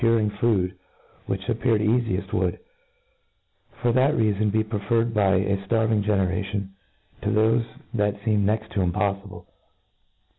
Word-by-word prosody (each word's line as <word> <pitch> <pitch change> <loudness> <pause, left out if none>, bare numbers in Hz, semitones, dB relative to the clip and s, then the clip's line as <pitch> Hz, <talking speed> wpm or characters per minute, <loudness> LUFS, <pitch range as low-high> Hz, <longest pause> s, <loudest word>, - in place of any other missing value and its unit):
5I 115 -1 +4
ring 105 -2 0
food 95 -6 +1 0.5
which 95 +1 -3
appeared 115 -1 +1
caficft 110 -3 0
would, - - 0 1.3
for 120 - +3
that 130 +5 +3
Tcafon, 105 -3 +1
.be 110 +1 +2
preferred, 115 +2 -1
by 100 -3 +3
a 100 +1 +1
ftarving 110 -2 +2
generation^ 95 0 -1 0.5
to - - -3
thofe 110 +2 +2 0.3
that 105 -2 0
feemed 105 -2 +2
next 110 +2 -1
to 100 - -2
impoffible. 100 +2 -2
105 Hz, 135 wpm, -24 LUFS, 100-115 Hz, 1.3 s, 5I